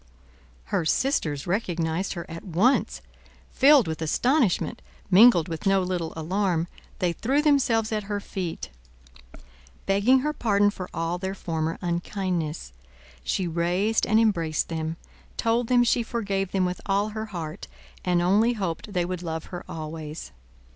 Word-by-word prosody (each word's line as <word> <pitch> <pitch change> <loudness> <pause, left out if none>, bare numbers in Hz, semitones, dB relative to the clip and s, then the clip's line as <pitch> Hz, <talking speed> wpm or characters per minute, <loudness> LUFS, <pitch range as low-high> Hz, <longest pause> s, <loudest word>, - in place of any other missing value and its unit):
Her - - +2
sisters 155 - 0
recognized 175 -2 -1
her 170 - -6
at 165 +1 -8
once. 200 +9 +1 0.5
Filled 275 - +6
with 160 0 -4
astonishment, 240 - +1 0.3
mingled 185 -4 +7
with 165 +3 -4
no 195 -1 +3
little 180 -3 -2
alarm, 170 +1 0 0.3
they 175 -2 0
threw 265 +10 0
themselves 245 -7 +2
at 215 -2 -2
her 205 -1 -1
feet, 175 - -5 1.1
begging 205 +7 +4
her 300 +2 -1
pardon 205 -6 +2
for 185 -3 -7
all 165 +2 -2
their 190 +1 -3
former 160 -3 -2
unkindness. 175 - -2 0.5
She 185 - -1
raised 175 +6 +1
and 220 - +4
embraced 170 -9 +1
them; 160 0 -3 0.4
told 230 +1 +1
them 245 0 +4
she 240 0 +2
forgave 200 -5 -2
them 190 -2 +1
with 180 0 -3
all 200 +2 +1
her 220 +1 -5
heart, 165 -6 -6 0.4
and 175 -1 +2
only 210 +7 +3
hoped 195 -1 -4
they 175 -2 +1
would 180 0 -4
love 160 -2 -4
her 175 - -5
always. 155 - -6
185 Hz, 145 wpm, -25 LUFS, 165-215 Hz, 1.1 s, mingled